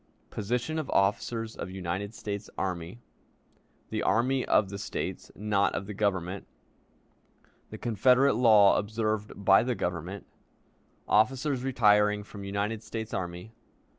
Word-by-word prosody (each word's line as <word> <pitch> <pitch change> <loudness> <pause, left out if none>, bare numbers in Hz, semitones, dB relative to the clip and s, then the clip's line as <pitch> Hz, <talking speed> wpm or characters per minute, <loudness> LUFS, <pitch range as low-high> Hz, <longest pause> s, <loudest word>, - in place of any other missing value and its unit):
Position 120 +9 -2
of 155 - -5
Officers 110 +3 0
of - - -6
United 95 +3 -4
States 105 0 -5
Army. 90 +4 -4 0.9
The - - -1
Army 130 +3 +2
of 100 - +2
the 100 - -5
States, - - -5
not 100 -1 +1
of - - -3
the 105 - -6
Government. 95 -2 -2 1.2
The - - -8
Confederate 125 +5 +3
Law 110 -4 +6
observed 110 0 -2
by 95 - +7
the 125 +1 -1
Government. 90 +2 -4 0.8
Officers 130 +5 +2
retiring 105 -5 +3
from 100 -1 -10
United 100 +2 -2
States 110 -1 -6
Army. 90 +2 -5
105 Hz, 125 wpm, -28 LUFS, 100-115 Hz, 1.2 s, by